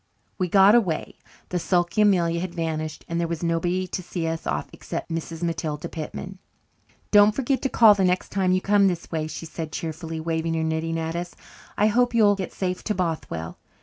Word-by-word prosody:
We 185 - +1
got 195 +2 +6
away. 195 -10 +1 0.3
The 180 - -1
sulky 175 +3 +1
Amelia 175 -5 +3
had 175 0 -5
vanished, 155 -2 -3
and 170 0 -2
there 170 - 0
was 170 0 -4
nobody 175 +2 0
to - - -3
see 175 -1 -4
us 165 0 -3
off 75 +1 -2
except - - -6
Mrs. 165 +1 -4
Matilda 155 -3 -2
Pitman. 185 +4 -7 0.7
"Don't 205 0 +7
forget 270 0 0
to 270 - 0
call 225 -4 +7
the 200 -1 0
next 180 0 +1
time 190 -2 +1
you 185 0 +2
come 200 0 +4
this 175 -3 -3
way," 155 -2 -2
she 160 - -7
said 160 -1 -6
cheerfully, 160 0 -5
waving 165 0 -1
her 160 - 0
knitting 160 +1 -1
at 165 0 -3
us. 175 0 -5 0.4
"I 210 - +4
hope 240 +3 +2
you'll 210 -3 +5
get 195 -2 -4
safe 185 -1 -3
to 210 - 0
Bothwell. 155 - -3
170 Hz, 200 wpm, -24 LUFS, 165-195 Hz, 0.7 s, Don't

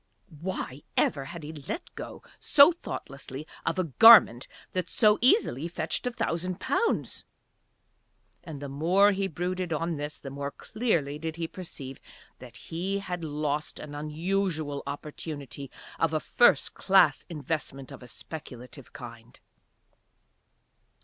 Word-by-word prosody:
Why 155 -6 -4 0.2
ever 135 -2 +2
had 165 +3 -8
he 155 +2 -7
let 155 - -6
go - - -8 0.2
so 285 +3 +8
thoughtlessly 140 - -7 0.2
of - - 0
a 185 - +2
garment 165 - +7 0.2
that 185 -1 -2
so 215 -2 +4
easily 240 - +3
fetched 175 +8 -2
a - - +2
thousand 180 -5 -2
pounds? 465 - -1 1.2
And 160 -5 -8
the 140 - -6
more 175 +9 +3
he 195 0 -1
brooded 180 +1 -3
on 165 +1 -1
this 145 +1 -4
the 135 - -8
more 140 0 -4
clearly 160 - -2
did 160 0 -4
he 165 -1 -3
perceive 140 -7 -9 0.4
that 125 -2 -12
he 175 +8 -3
had 180 -3 -5
lost 150 -1 -3
an 150 -1 -8
unusual 155 0 -2
opportunity 145 -2 -7 0.3
of 160 -1 +1
a - - +2
first 240 +9 +3
class 195 0 +4
investment 150 -4 -4
of - - -10
a 125 - -11
speculative 125 0 -10
kind. 120 -2 -11
155 Hz, 135 wpm, -28 LUFS, 140-185 Hz, 1.2 s, so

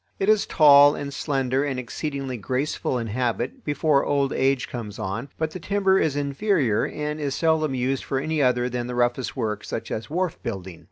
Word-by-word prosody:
It 195 - 0
is 215 -1 +3
tall 145 -1 +7
and 140 -1 -5
slender 135 -2 0
and 135 -3 -2
exceedingly 135 +2 -4
graceful 130 +4 -2
in 120 - -3
habit 120 +2 -2
before 145 -1 +2
old 140 -1 +1
age 135 -1 +1
comes 105 -4 -7
on, 110 +6 -4
but 160 -1 -1
the 185 - -7
timber 195 -1 +2
is 150 -3 +1
inferior 140 - +1
and 150 0 -4
is 140 -3 -2
seldom 160 -4 +1
used 130 +1 -1
for 135 - -2
any 155 +2 -1
other 125 -2 +2
than 120 -1 -3
the 125 - -4
roughest 120 +2 0
work, 105 -4 -2
such - - -5
as 110 +1 -4
wharf 180 +2 -2
building. 95 -6 -6
135 Hz, 190 wpm, -24 LUFS, 120-150 Hz, -, tall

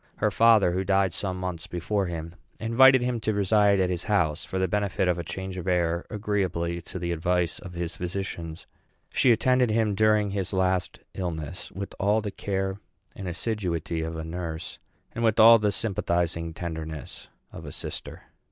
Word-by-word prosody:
Her - - +1
father, 110 -5 +5
who 95 +2 -1
died 95 -2 +2
some 95 +1 -3
months 90 -1 -4
before 95 +3 -1
him, 85 -1 -5 0.3
invited 130 +3 +6
him 125 -1 -1
to 110 -1 -1
reside 100 0 +3
at 90 -1 +2
his 90 -1 -3
house 85 -7 +1
for 95 - -5
the 95 0 +1
benefit 100 -1 0
of 90 -1 +1
a - - -3
change 95 +3 -6
of 90 - -6
air, 85 -1 +1
agreeably 95 -5 -1
to 85 - -8
the 85 -1 -3
advice 85 +1 0
of 95 -3 -10
his 85 0 -4
physicians. 85 -3 -5 0.5
She 125 - +4
attended 125 +2 +3
him 110 -1 +2
during 105 0 +3
his 100 -1 -3
last 95 -1 0
illness 85 -2 -5
with 100 +1 -6
all 105 +3 +3
the 105 -2 -4
care 95 0 -2 0.4
and 95 - -6
assiduity 90 -4 -2
of 80 +1 -4
a 80 - -4
nurse 80 -1 -5 0.3
and 115 - -3
with 110 -1 +2
all 115 +1 +9
the 105 -1 +1
sympathizing 85 -6 -1
tenderness 80 -4 -6 0.2
of - - -9
a - - -7
sister. - - -7
95 Hz, 180 wpm, -26 LUFS, 85-105 Hz, 0.5 s, all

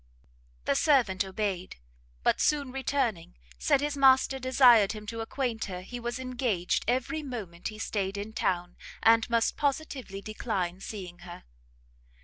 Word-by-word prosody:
The - - +2
servant 215 - +3
obeyed; 190 -2 -3 0.5
but - - +2
soon 285 -3 +1
returning, 255 - -1 0.2
said 265 - +3
his 295 0 -1
master 265 -1 +4
desired 250 -5 +5
him 210 -1 -8
to 230 +2 -5
acquaint 230 -1 -2
her 180 -2 -6
he 245 +6 -7
was 240 +1 -3
engaged 245 -8 -1
every 260 +6 0
moment 210 - -6
he 215 - -7
stayed 200 -2 -2
in 205 +2 -5
town, 175 -4 -1 0.3
and 225 +1 +5
must 230 -1 +1
positively 275 -8 -2
decline 195 -4 -3
seeing 185 -4 -7
her. 175 0 -10
225 Hz, 140 wpm, -29 LUFS, 190-260 Hz, 0.5 s, desired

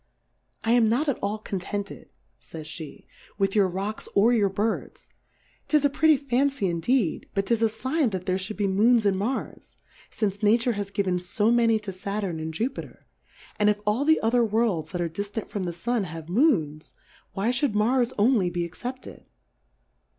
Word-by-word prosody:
I 225 - +1
am 235 -2 +4
not 260 +8 +1
at 280 - 0
all 205 +2 -2
contented, 200 -1 -5 0.3
fays 160 -2 -10
Jhe, 155 0 -8 0.3
with 195 -1 +1
your 205 -3 +4
Rocks, 195 +4 -4
or 220 +5 +5
your 205 -4 +3
Birds; 210 +4 -3 0.6
'tis 300 -2 +3
a 285 - +3
pretty 310 +1 +4
Fancy 275 -2 0
indeed, 180 +3 0
but 195 0 0
'tis 230 0 +1
a - - +5
fign 260 +5 0
that 185 -3 -5
there 185 -1 +1
fhould 190 +3 -5
be 205 - 0
Moons 215 +4 +3
in 200 - +4
Marsy 220 +8 -4 0.3
fince 205 -2 -2
Nature 230 +3 +3
has 205 -3 -4
given 190 -3 0
fo 205 +5 +1
many 230 -2 +4
to 210 -2 -6
Saturn 195 -2 -3
and 160 0 -4
Jufiter^ 230 - -4 0.6
and 210 0 +4
if 210 0 +1
all 210 +6 +1
the 315 +2 +4
other 235 +2 +3
Worlds 215 -8 0
that 180 -2 -3
are 170 - 0
diftant 200 +6 -5
from 200 -3 -3
the 175 - -2
Stm^ 215 +5 -1
have 165 -2 -8
Moonsy 170 - +1 0.4
why 200 +4 0
Ihould 250 -2 0
Mars 240 +3 +2
only 210 -4 +3
be 175 0 -2
ex 170 - -12
cepted 255 +1 -7
210 Hz, 180 wpm, -25 LUFS, 190-240 Hz, 0.6 s, or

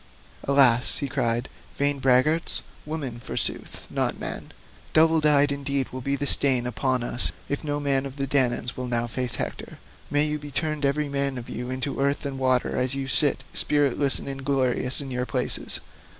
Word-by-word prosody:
"Alas," 130 -4 +4
he 140 - -2
cried, 120 0 0 0.3
"vain 145 0 0
braggarts, 135 +5 +3 0.2
women 140 -7 -4
forsooth - - -3
not - - -1
men, - - -6 0.4
double 160 0 +5
dyed 145 -1 +5
indeed 140 -1 -2
will 130 - -7
be 140 +2 -1
the 145 - -2
stain 130 -3 +3
upon 125 0 0
us 120 0 -1 0.2
if 140 - -3
no 145 -1 -2
man 140 -1 0
of 135 - -10
the 140 -1 -2
Danaans 125 -2 0
will 125 0 -4
now 120 -1 +1
face 125 +1 -2
Hector. - - -5 0.3
May 145 +1 +2
you 150 0 -2
be 145 0 -9
turned 150 -1 -1
every 150 +2 0
man 140 -1 -1
of 120 - -8
you 125 +1 -5
into 130 +2 -3
earth 140 +1 0
and 135 -1 -4
water 130 -1 +1
as 130 +1 0
you 135 -1 -3
sit 135 -1 +3
spiritless 140 -1 +2
and - - -7
inglorious 135 -1 +1
in 135 -2 -7
your 125 0 -2
places. 125 -2 +1
135 Hz, 180 wpm, -25 LUFS, 125-145 Hz, 0.4 s, double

